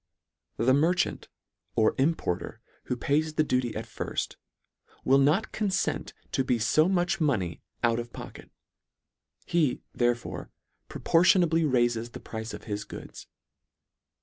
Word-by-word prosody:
The 130 +3 +3
merchant, 165 +6 +1 0.5
or 110 - +4
importer 135 - 0 0.3
who 125 - -2
pays 155 +4 0
the 155 - +3
duty 125 -5 0
at - - -4
firft, - - -4 0.7
will 135 +1 +5
not 155 +11 +3
confent 205 -3 -1 0.2
to 135 - +1
be 125 -2 +1
Co 125 +9 +3
much 180 -2 +1
money 105 - 0 0.2
out 115 0 +3
of 120 0 -6
pocket. - - -10 1.0
He, 160 -7 +1
therefore, 120 -1 -1 0.4
pro - - -8
portionably 165 -3 +4
raifes 120 -2 +1
the - - -7
price 110 0 -6
of - - -8
his 105 -2 -4
goods. - - -10
135 Hz, 130 wpm, -28 LUFS, 120-165 Hz, 1.0 s, will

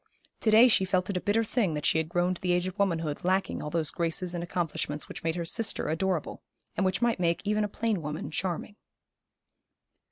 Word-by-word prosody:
To 220 - +1
day 225 +3 +8
she 220 -5 +4
felt 185 0 0
it 190 - -2
a - - -2
bitter 220 +3 +2
thing 215 -7 0
that 150 - -3
she 160 - +3
had 160 0 -2
grown 175 +1 +1
to 180 - -10
the 180 -1 +1
age 180 0 +1
of 185 +2 -6
womanhood 165 -6 0
lacking 190 +2 0
all 150 - -4
those 160 -1 0
graces 170 +2 -2
and 170 -1 -3
accomplishments 165 -4 -2
which - - -8
made 165 0 0
her 170 -1 -3
sister 220 +6 0
adorable, 170 0 -1 0.3
and - - 0
which 185 +5 -1
might 235 -4 +2
make 170 -1 +1
even 210 +1 +1
a - - 0
plain 215 -3 -1
woman 150 0 -5
charming. 185 +5 -3
180 Hz, 220 wpm, -28 LUFS, 165-200 Hz, 0.3 s, day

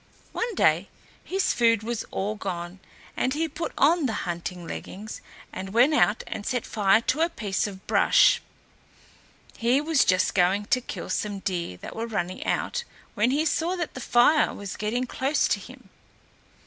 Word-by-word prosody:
One 460 -2 -2
day - - +3 0.3
his 385 +1 0
food 230 -2 +3
was 235 0 -3
all 205 +2 -2
gone, 180 -3 -5 0.4
and 260 +2 0
he 325 +2 0
put 320 +2 -5
on 315 0 +4
the 225 - -2
hunting 175 0 -5
leggings 205 +5 -7 0.3
and 190 +2 -6
went 255 +6 +5
out 225 -7 +3
and 205 - -5
set 250 +1 -2
fire 210 0 +3
to 275 +6 0
a 335 - +3
piece 205 - -2
of 190 -2 -10
brush. - - +4 1.2
He 240 +4 +3
was 305 -1 +3
just 185 0 +2
going 195 +2 +2
to 255 +4 +1
kill - - -6
some 205 -1 -2
deer 175 - -3
that - - -8
were 230 +1 -3
running 185 -5 -3
out, - - -1 0.3
when 215 +4 +2
he 295 +4 +1
saw 335 +3 0
that 345 -3 -4
the 260 - -7
fire 245 +7 +4
was 200 -1 -6
getting 230 +4 -1
close 270 +4 0
to - - +1
him. - - -13
230 Hz, 175 wpm, -26 LUFS, 195-285 Hz, 1.2 s, went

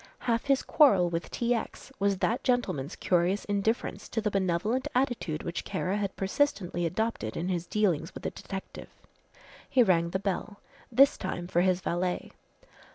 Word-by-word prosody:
Half 230 -1 +1
his 275 -1 +2
quarrel 195 - +5
with 165 0 -3
T. 240 0 0
X. 235 +3 -5
was 200 -1 +2
that 230 +7 0
gentleman's 185 - 0
curious 180 +3 +1
indifference 205 +3 -1
to 225 - -1
the 210 -1 -1
benevolent 195 +6 0
attitude 245 - 0
which 170 - -4
Kara 190 0 -2
had 200 -2 -2
persistently 195 -5 0
adopted 200 - -2
in 175 +3 -2
his 175 -2 -2
dealings 180 -7 +1
with - - -8
the - - -2
detective. 190 -1 -8 0.8
He 255 -2 +5
rang 170 -5 +3
the 190 - -1
bell, 200 +1 -3 0.3
this 275 +4 +5
time 175 -2 -3
for 175 0 +1
his 185 0 +2
valet. 180 +1 -2
195 Hz, 160 wpm, -29 LUFS, 175-230 Hz, 0.8 s, quarrel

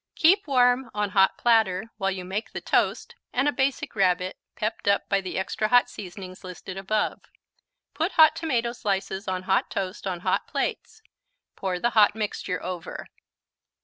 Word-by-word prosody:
Keep 365 +3 +4
warm 250 -2 +3
on 210 -1 -1
hot 190 -1 +4
platter 225 -3 +2
while 195 -2 0
you 190 -2 -4
make 195 +4 -4
the - - -3
toast - - 0 0.2
and 265 +3 +1
a - - +4
Basic 265 -3 -1
Rabbit, 185 -2 +1 0.2
pepped 215 0 -3
up 200 0 +2
by 200 -1 +2
the 185 - -5
extra 190 +3 -1
hot 245 +2 +4
seasonings 185 -1 -9
listed 185 +1 -8
above. 195 +3 -1 0.7
Put 325 +5 -1
hot 315 -1 +7
tomato 250 -8 -1
slices 195 -3 -3
on 185 -1 -2
hot 190 0 +1
toast 190 0 -4
on 180 -2 -3
hot - - 0
plates; 440 - -3 0.5
pour 185 -2 -2
the 240 +5 +1
hot 210 -2 +5
mixture 205 -4 -3
over. 180 -2 -6
200 Hz, 165 wpm, -26 LUFS, 190-240 Hz, 0.7 s, hot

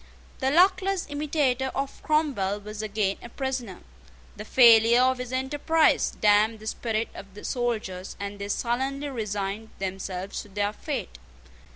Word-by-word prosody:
The 265 - +1
luckless 375 +4 +3
imitator 285 -3 0
of 275 0 -4
Cromwell 265 -11 0
was 210 +1 -7
again 210 -2 -1
a 240 - -9
prisoner. 255 -7 -4 0.5
The 210 - -8
failure 235 -1 +7
of 260 0 +2
his 250 -1 -5
enterprise 290 +5 +2
damped 215 +1 +4
the 215 - -12
spirit 225 0 -2
of 195 -1 -11
the 210 - -9
soldiers; 215 -7 -3
and 200 0 -5
they 200 - -4
sullenly 265 +6 -1
resigned 210 -3 -3
themselves 190 0 -4
to 210 - -14
their 205 +1 -1
fate. 65 - -5
225 Hz, 145 wpm, -26 LUFS, 205-265 Hz, 0.5 s, failure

